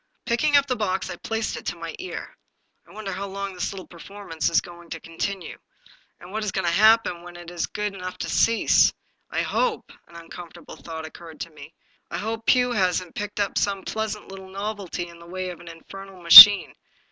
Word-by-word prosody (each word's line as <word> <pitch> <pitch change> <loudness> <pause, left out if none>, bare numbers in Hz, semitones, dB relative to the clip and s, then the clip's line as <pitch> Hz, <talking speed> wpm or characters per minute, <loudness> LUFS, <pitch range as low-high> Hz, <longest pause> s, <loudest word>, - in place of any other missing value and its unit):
Picking 290 +5 +2
up 280 - +2
the 255 - -2
box, 195 -4 -3
I - - -6
placed 225 +3 -4
it - - -11
to - - -3
my 165 -1 -8
ear. 370 - -8 0.3
" - - -43
I - - -18
wonder 215 -2 -7
how 195 +2 -5
long 195 0 -6
this 180 - -4
little 190 -2 -9
performance 175 -2 -6
is 170 - +3
going 175 -1 -13
to 165 - -7
continue. 170 +3 -6 0.6
And 175 - -13
what 215 +1 -4
is 210 - -3
going 190 0 -3
to 170 - +1
happen 215 -3 +3
when 175 0 -13
it 175 0 -11
is 175 -2 -3
good 210 -1 -4
enough 185 -1 -8
to - - -5
cease? 230 0 +3 0.4
I - - -2
hope 480 -3 -2
" - - -29
— - - -45
an 170 - -19
uncomfortable 170 0 -12
thought 160 -1 -9
oc 160 - -11
curred 165 -3 -13
to 170 - -7
me 150 +1 -14
— - - -38
" - - -49
I - - -5
hope 225 +1 -5
Pugh 250 -1 +3
hasn't 185 -5 -1
picked 205 0 -6
up 200 - -1
some 195 -2 -2
pleasant 220 -1 -5
little 190 -1 -11
novelty 195 -3 -6
in 170 0 -15
the 170 - -15
way 185 0 -5
of 175 - -12
an 175 - -15
infernal 195 +3 -12
machine. 190 +4 +11
190 Hz, 230 wpm, -23 LUFS, 170-210 Hz, 0.6 s, machine